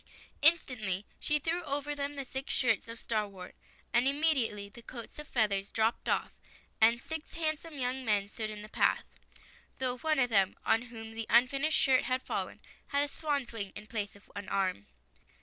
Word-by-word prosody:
Instantly 245 Hz, -, +3 dB
she 300 Hz, -, +3 dB
threw 330 Hz, +4 st, -1 dB
over 290 Hz, 0 st, -1 dB
them 285 Hz, 0 st, -3 dB
the 275 Hz, -1 st, -4 dB
six 265 Hz, +1 st, -4 dB
shirts 225 Hz, -6 st, +2 dB
of 230 Hz, 0 st, -8 dB
starwort, 200 Hz, -5 st, -3 dB, 0.4 s
and 240 Hz, +2 st, +4 dB
immediately 275 Hz, -8 st, +2 dB
the 225 Hz, +4 st, -13 dB
coats 235 Hz, +3 st, -9 dB
of 300 Hz, -, -7 dB
feathers 200 Hz, -4 st, +1 dB
dropped 225 Hz, +1 st, +1 dB
off, -, -, +1 dB, 0.5 s
and 230 Hz, +2 st, +6 dB
six 315 Hz, +4 st, -6 dB
handsome 315 Hz, -1 st, -2 dB
young 260 Hz, 0 st, -1 dB
men 205 Hz, -4 st, +2 dB
stood 215 Hz, +1 st, -4 dB
in 210 Hz, -1 st, -6 dB
the -, -, -8 dB
path -, -, +2 dB, 0.4 s
— -, -, -26 dB
though 250 Hz, -1 st, 0 dB
one 310 Hz, +2 st, +1 dB
of 245 Hz, -3 st, +2 dB
them, 195 Hz, -3 st, +4 dB
on 225 Hz, -, +4 dB
whom 225 Hz, -2 st, -8 dB
the 225 Hz, 0 st, -4 dB
unfinished 275 Hz, +6 st, +4 dB
shirt 260 Hz, -2 st, +4 dB
had 255 Hz, +1 st, 0 dB
fallen, -, -, -3 dB, 0.3 s
had 285 Hz, 0 st, +2 dB
a -, -, 0 dB
swan's 285 Hz, -3 st, -2 dB
wing 200 Hz, -4 st, -3 dB
in 205 Hz, -, -7 dB
place 210 Hz, -2 st, -3 dB
of 200 Hz, -, -18 dB
an 205 Hz, 0 st, -6 dB
arm. 185 Hz, -, 0 dB
240 Hz, 185 wpm, -32 LUFS, 215-280 Hz, 0.5 s, and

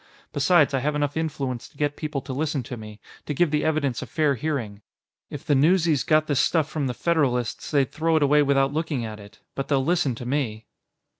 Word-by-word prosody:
Besides, 160 Hz, -6 st, +3 dB
I 135 Hz, -, +2 dB
have 150 Hz, +3 st, -1 dB
enough 145 Hz, -1 st, -1 dB
influence 140 Hz, -6 st, -3 dB
to -, -, -24 dB
get 145 Hz, 0 st, 0 dB
people 150 Hz, -3 st, -4 dB
to 130 Hz, -, -6 dB
listen 145 Hz, -1 st, -1 dB
to 125 Hz, -, -7 dB
me, 105 Hz, -2 st, -10 dB, 0.3 s
to 150 Hz, -, -2 dB
give 170 Hz, +1 st, +2 dB
the 150 Hz, -1 st, +1 dB
evidence 150 Hz, -5 st, 0 dB
a -, -, -6 dB
fair 150 Hz, -3 st, +1 dB
hearing. 120 Hz, -7 st, -3 dB, 0.5 s
If 145 Hz, -, -8 dB
the 155 Hz, -, +2 dB
newsies 160 Hz, 0 st, +3 dB
got 155 Hz, 0 st, +3 dB
this 145 Hz, -4 st, 0 dB
stuff 160 Hz, -4 st, +2 dB
from 150 Hz, -4 st, -2 dB
the 125 Hz, -, -3 dB
Federalists, 135 Hz, -9 st, 0 dB
they'd 140 Hz, -4 st, +1 dB
throw 165 Hz, +1 st, 0 dB
it 155 Hz, -, +3 dB
away 150 Hz, +1 st, +4 dB
without 140 Hz, -1 st, +2 dB
looking 155 Hz, -6 st, -2 dB
at 110 Hz, -1 st, -7 dB
it. 100 Hz, +1 st, -15 dB
But 135 Hz, -, -4 dB
they'll 135 Hz, -2 st, +1 dB
listen 170 Hz, -7 st, +1 dB
to 120 Hz, -, -8 dB
me." 120 Hz, -5 st, -2 dB
145 Hz, 220 wpm, -24 LUFS, 130-155 Hz, 0.5 s, away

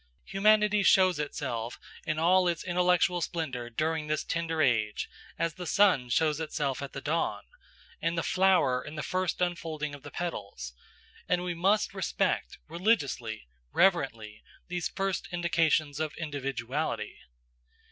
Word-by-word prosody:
Humanity 210 Hz, +1 st, +4 dB
shows 185 Hz, -4 st, +5 dB
itself 125 Hz, -6 st, -3 dB, 0.3 s
in 155 Hz, -, 0 dB
all 180 Hz, +3 st, +4 dB
its 170 Hz, -2 st, -1 dB
intellectual 180 Hz, 0 st, +2 dB
splendour 145 Hz, -8 st, -3 dB
during 155 Hz, +5 st, -1 dB
this 155 Hz, 0 st, 0 dB
tender 165 Hz, -1 st, -2 dB
age 110 Hz, -7 st, +1 dB, 0.3 s
as 165 Hz, -1 st, 0 dB
the 180 Hz, 0 st, -7 dB
sun 180 Hz, -9 st, +4 dB
shows 155 Hz, +4 st, +2 dB
itself 150 Hz, -4 st, -2 dB
at 140 Hz, -, -6 dB
the 135 Hz, -, -5 dB
dawn, 165 Hz, +4 st, -1 dB, 0.6 s
and 165 Hz, +1 st, 0 dB
the 165 Hz, -, 0 dB
flower 180 Hz, -10 st, +3 dB
in 150 Hz, -, -8 dB
the 155 Hz, -, -4 dB
first 185 Hz, -2 st, -1 dB
unfolding 160 Hz, -4 st, -2 dB
of 140 Hz, -, -9 dB
the 145 Hz, -, -9 dB
petals; 100 Hz, -, -5 dB, 0.6 s
and 180 Hz, 0 st, +2 dB
we 180 Hz, -1 st, -2 dB
must 195 Hz, +6 st, +2 dB
respect 190 Hz, 0 st, -1 dB
religiously, 145 Hz, -, 0 dB, 0.3 s
reverently, 135 Hz, -, +1 dB, 0.3 s
these 175 Hz, -1 st, -1 dB
first 195 Hz, -1 st, -2 dB
indications 165 Hz, -4 st, +1 dB
of 155 Hz, -1 st, -3 dB
individuality. 135 Hz, -5 st, -3 dB
160 Hz, 135 wpm, -29 LUFS, 140-180 Hz, 0.6 s, shows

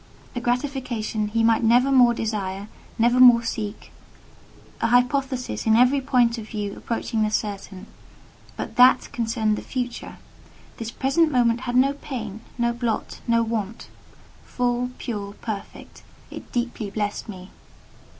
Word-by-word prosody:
A 245 Hz, -, -2 dB
gratification 245 Hz, -4 st, -2 dB
he 225 Hz, +2 st, 0 dB
might 225 Hz, 0 st, +4 dB
never 245 Hz, +4 st, +4 dB
more 245 Hz, -3 st, +5 dB
desire, 205 Hz, -3 st, -3 dB, 0.3 s
never 240 Hz, +2 st, +3 dB
more 245 Hz, -2 st, +8 dB
seek—an 220 Hz, +1 st, -7 dB
hypothesis 250 Hz, 0 st, 0 dB
in 220 Hz, -, +5 dB
every 255 Hz, +4 st, +4 dB
point 240 Hz, -2 st, +2 dB
of 215 Hz, -, -8 dB
view 205 Hz, -2 st, -4 dB
approaching 230 Hz, -1 st, -3 dB
the 215 Hz, -, +2 dB
certain; 200 Hz, -2 st, -4 dB, 0.7 s
but -, -, -6 dB
that 250 Hz, +1 st, +5 dB
concerned 225 Hz, -3 st, 0 dB
the -, -, -5 dB
future. 245 Hz, -2 st, -5 dB, 0.6 s
This 230 Hz, -1 st, -5 dB
present 275 Hz, +6 st, +1 dB
moment 240 Hz, -2 st, +2 dB
had 245 Hz, -, -2 dB
no 270 Hz, +2 st, +4 dB
pain, 225 Hz, -7 st, -7 dB, 0.2 s
no 235 Hz, -1 st, +1 dB
blot, 235 Hz, -2 st, -3 dB
no 230 Hz, 0 st, +3 dB
want; 225 Hz, -1 st, -4 dB, 0.5 s
full, 245 Hz, 0 st, -1 dB
pure, 205 Hz, -4 st, -5 dB
perfect, 210 Hz, -2 st, -8 dB, 0.3 s
it -, -, -10 dB
deeply 240 Hz, -3 st, -3 dB
blessed 205 Hz, +1 st, -3 dB
me. 185 Hz, -2 st, -9 dB
235 Hz, 135 wpm, -23 LUFS, 215-250 Hz, 0.7 s, more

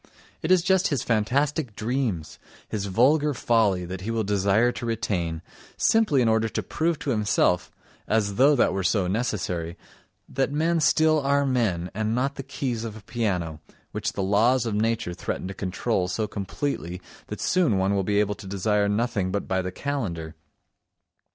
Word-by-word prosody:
It 160 Hz, -, -3 dB
is 185 Hz, -2 st, +5 dB
just 190 Hz, 0 st, +3 dB
his 140 Hz, -7 st, -1 dB
fantastic 125 Hz, +3 st, 0 dB
dreams, 110 Hz, -, -2 dB, 0.3 s
his 100 Hz, -2 st, -3 dB
vulgar 145 Hz, +9 st, +3 dB
folly 105 Hz, -7 st, +2 dB
that 90 Hz, +1 st, -6 dB
he 105 Hz, -, -5 dB
will 115 Hz, -1 st, 0 dB
desire 100 Hz, +4 st, +2 dB
to 120 Hz, -, -6 dB
retain, 90 Hz, -8 st, -2 dB, 0.3 s
simply 190 Hz, -, +3 dB
in -, -, +2 dB
order 110 Hz, 0 st, +2 dB
to -, -, -3 dB
prove 165 Hz, 0 st, -1 dB
to 140 Hz, -, -3 dB
himself—as 105 Hz, 0 st, 0 dB
though 140 Hz, +7 st, +5 dB
that 120 Hz, -, +3 dB
were 95 Hz, -, -1 dB
so 95 Hz, +1 st, +1 dB
necessary—that 95 Hz, +4 st, -4 dB
men 165 Hz, +3 st, +1 dB
still 155 Hz, +1 st, +4 dB
are 140 Hz, 0 st, +2 dB
men 105 Hz, -10 st, 0 dB
and 110 Hz, +2 st, -1 dB
not 135 Hz, +3 st, 0 dB
the 140 Hz, -, -6 dB
keys 130 Hz, -4 st, -3 dB
of 110 Hz, -2 st, -6 dB
a 105 Hz, -, -13 dB
piano, 95 Hz, -9 st, -2 dB, 0.3 s
which -, -, -3 dB
the 100 Hz, -, -2 dB
laws 115 Hz, +6 st, +3 dB
of 115 Hz, -, -2 dB
nature 115 Hz, -2 st, 0 dB
threaten 90 Hz, -, -4 dB
to 95 Hz, -, -5 dB
control 95 Hz, +1 st, -1 dB
so 105 Hz, +4 st, -2 dB
completely 100 Hz, -3 st, -4 dB, 0.3 s
that -, -, -6 dB
soon 175 Hz, -, +2 dB
one 95 Hz, +1 st, +1 dB
will 100 Hz, -, +1 dB
be 100 Hz, +2 st, +1 dB
able 105 Hz, 0 st, +1 dB
to 100 Hz, -1 st, -11 dB
desire 100 Hz, +1 st, +1 dB
nothing 105 Hz, -3 st, 0 dB
but 100 Hz, +1 st, -2 dB
by 95 Hz, 0 st, 0 dB
the 90 Hz, 0 st, -4 dB
calendar. 95 Hz, -, -4 dB
110 Hz, 170 wpm, -25 LUFS, 95-130 Hz, 0.3 s, is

